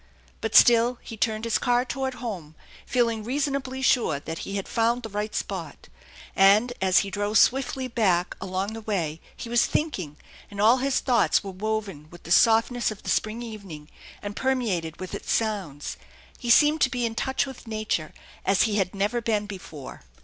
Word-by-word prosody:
But 225 -1 -3
still 240 +1 +6
he 225 - -8
turned 220 0 -1
his 230 - +1
car 245 0 +2
toward 265 0 -3
home, 185 -12 -6 0.3
feeling 230 -3 +1
reasonably 265 +1 -2
sure 240 - +2
that 160 +2 -6
he 195 - -5
had 195 - -3
found 235 +2 +1
the 225 - -6
right 210 +1 -4
spot; 170 -7 -5 0.5
and, 205 +5 +5
as 190 -1 +4
he 195 - -7
drove 205 +2 0
swiftly 265 0 +2
back 190 -7 +1
along 190 +2 -3
the 225 - -7
way, 170 -8 -2 0.2
he - - -7
was 240 0 +3
thinking, 185 - -2 0.3
and 200 - -9
all 225 +5 +5
his 270 +1 0
thoughts 245 -4 +2
were 195 - -6
woven 195 -6 -4
with 175 +1 -14
the 170 - -8
softness 230 +4 +4
of 215 -2 -8
the - - -2
spring 220 +3 -1
evening 195 -10 -9 0.3
and 205 0 -5
permeated 210 -13 -1
with 185 - -7
its - - -4
sounds. 195 -10 -2 0.4
He 240 - -5
seemed 300 +5 +5
to 265 - +4
be 245 -1 -1
in 225 - -2
touch 265 +5 -1
with 265 -3 -10
nature 215 -8 -2 0.3
as 195 0 +3
he 215 -2 0
had 190 -1 -1
never 210 +5 0
been 215 -2 0
before. 180 -8 -9
215 Hz, 185 wpm, -25 LUFS, 190-245 Hz, 0.5 s, still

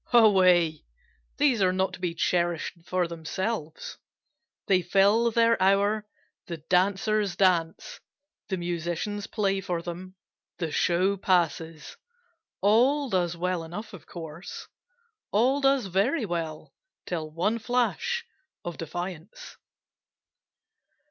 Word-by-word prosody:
Away! 185 -8 +5 0.5
these 275 -7 +3
are 185 -1 +4
not 190 0 0
to - - -8
be 175 -2 -2
cherish'd 170 0 -1
for 180 -1 0
themselves, 165 +1 -4 0.7
They 185 -2 +3
fill 200 +6 +3
their 230 -2 +3
hour, 200 +2 +2 0.4
the 170 - -5
dancers 195 +4 +1
dance, 185 - +1 0.5
the 190 - -1
musicians 175 +4 -3
play 195 -3 0
for 175 -2 -3
them, 180 +2 -7 0.4
The 165 -3 -3
show 185 +5 +2
passes, 165 -4 0 0.6
all 255 +6 +3
does 175 -2 0
well 180 -1 -1
enough 205 +7 -7
of 185 - -12
course, 165 0 -8 0.6
All 255 +7 +2
does 270 -3 +3
very 205 - +1
well 165 -4 -4 0.3
till 160 -3 -3
one 185 +9 0
flash 250 - 0 0.4
of 175 -1 -5
defiance. 175 +2 -7
185 Hz, 110 wpm, -27 LUFS, 170-215 Hz, 0.7 s, Away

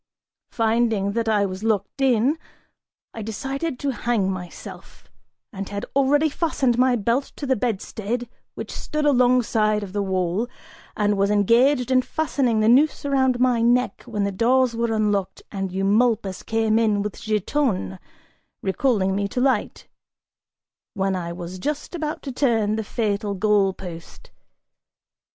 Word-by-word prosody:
Finding 225 -3 +1
that 225 +1 -1
I 205 -2 +3
was 190 +1 -5
locked 220 +4 -1
in, 265 +4 +3 0.7
I 225 - -6
decided 270 +7 -4
to 280 +1 -1
hang 230 -6 0
myself, 180 -2 -9 0.5
and 195 -1 -5
had 200 0 -4
already 285 +3 +3
fastened 275 -6 0
my 255 0 +4
belt 235 +5 0
to 290 - -5
the 260 -1 +2
bedstead 230 +1 -3 0.3
which - - -6
stood 305 0 -3
alongside 245 -5 +3
of 190 -2 -8
the 205 - 0
wall, 190 +3 -1 0.5
and 205 -1 +1
was 200 0 +3
engaged 240 +6 +3
in 255 0 +5
fastening 260 -6 0
the 215 - +3
noose 285 +6 +4
around 260 -3 +2
my 250 -2 +3
neck, 245 +2 +2
when 210 -4 -2
the 200 - 0
doors 245 +4 +2
were 230 0 0
unlocked 205 -3 -1
and 195 -2 -3
Eumolpus 200 +1 +1
came 225 0 +1
in 210 -3 +2
with 210 - -6
Giton, 210 - -1 0.6
recalling 195 -2 +1
me 200 0 0
to 245 - -3
light 265 +1 0 1.1
when 195 -1 0
I 170 -2 -4
was 175 +1 -7
just 295 - -3
about 310 -3 -4
to 275 - -4
turn 225 -5 +1
the 220 - -2
fatal 205 -2 -2
goal 200 -1 +3
post! 175 -3 -10
225 Hz, 145 wpm, -23 LUFS, 200-255 Hz, 1.1 s, in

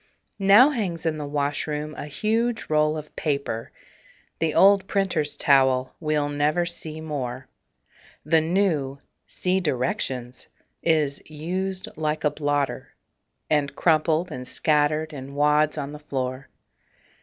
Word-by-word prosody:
Now 205 +9 +7
hangs 185 - -3
in 155 -1 0
the 145 - -4
washroom 150 +1 -2
a 145 - -7
huge 225 +8 -1
roll 155 0 +2
of 150 -1 -9
paper 140 -7 -2 0.7
The 160 -2 0
old 195 0 +5
printer's 185 -8 -1
towel 130 -2 +3
we'll 150 -2 0
never 150 +4 +1
see 160 -2 -5
more. 130 -5 -5 0.8
The 160 +1 +4
new 160 -6 0 0.3
(see 185 +1 0
directions) 130 -4 -2 0.3
is 150 -4 +1
"used 185 +5 -3
like 155 0 -2
a 150 - +3
blotter," 145 -2 -2 0.5
And 145 -2 0
crumpled 160 +1 +2
and 125 -2 -6
scattered 155 +2 +1
in 140 0 -8
wads 150 +1 +3
on 145 -1 -4
the 150 - -8
floor. 130 -2 -4
150 Hz, 125 wpm, -24 LUFS, 145-165 Hz, 0.8 s, Now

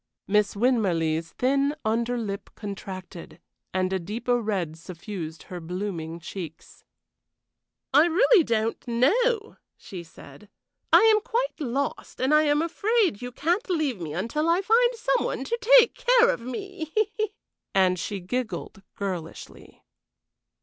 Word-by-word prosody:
Miss 210 0 +2
Winmarleigh's 170 -9 +1
thin 275 +3 +1
under 235 +2 0
lip 200 -4 -5
contracted, 190 -4 -8 0.3
and 185 0 0
a 190 - 0
deeper 235 +7 -1
red 190 -8 -2
suffused 165 -1 -7
her 180 - -8
blooming 170 -1 -5
cheeks. 170 -1 -9 1.1
"I 295 +4 +7
really 390 +3 +5
don't 225 -3 -1
know," 430 - +1 0.2
she 185 -3 -8
said. 170 +5 -15 0.4
"I - - +8
am 440 -1 +5
quite - - -2
lost, 275 -1 -3
and 265 +3 +2
I 305 0 +5
am 295 +1 +2
afraid 395 - +1
you 245 0 -5
can't 345 - -1
leave 300 - -1
me 155 -2 -5
until 235 - -1
I 350 +3 +2
find 475 +4 +4
some 470 +2 +1
one - - -2
to 475 +1 +3
take 470 - +3
care - - +4
of - - -4
me." 320 - -6 0.8
And 185 -2 +3
she 200 +3 -4
giggled 220 +1 -4
girlishly. 180 -5 -7
235 Hz, 135 wpm, -26 LUFS, -, 1.1 s, I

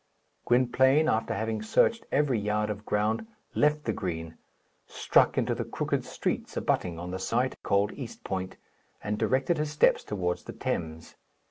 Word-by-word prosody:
Gwynplaine, 130 +5 +4
after 110 - +1
having 110 +1 -2
searched 225 - +2
every 135 -5 +2
yard 105 +1 0
of 105 0 -8
ground, 105 - 0 0.3
left 150 0 +2
the - - -1
green, 80 -5 -4 0.5
struck - - +3
into - - +1
the - - -2
crooked - - -2
streets - - -3
abutting 85 -2 0
on 90 +1 -6
the 95 - -4
site 120 +7 0
called 100 +1 +2
East 125 -5 -8
Point, 95 -1 -4 0.5
and 105 +1 -2
directed 130 +9 +1
his 150 0 -1
steps 150 0 +3
towards 90 -4 -2
the - - -7
Thames. 80 -1 -4
105 Hz, 155 wpm, -28 LUFS, 95-130 Hz, 0.5 s, Gwynplaine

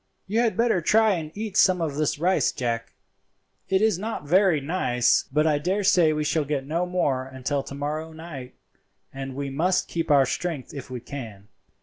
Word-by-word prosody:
"You 215 +4 0
had 235 -2 +1
better 230 -6 +2
try 220 +6 +4
and 160 -4 -4
eat 210 -2 -5
some 185 -2 +5
of 160 -4 -1
this 150 -1 0
rice, 180 +5 +2
Jack. 115 -2 -3 0.7
It 190 +2 +2
is 215 -5 +2
not 215 -6 -4
very 180 -1 +4
nice, 135 -6 +1
but 150 +3 +2
I 150 -2 +2
daresay 180 -1 +3
we 150 0 -1
shall 155 +1 +1
get 140 -2 -2
no 170 +5 -1
more 140 -8 0
until 135 +2 -2
to 140 - -9
morrow 155 +3 -4
night, 155 -6 -9 0.6
and 135 -1 -6
we 140 0 -4
must 175 +7 +1
keep 165 -1 -3
up 145 - +6
our 135 -1 +5
strength 155 0 -4
if 140 -3 -8
we 125 -2 -6
can. 110 -7 -9
155 Hz, 195 wpm, -25 LUFS, 135-180 Hz, 0.7 s, up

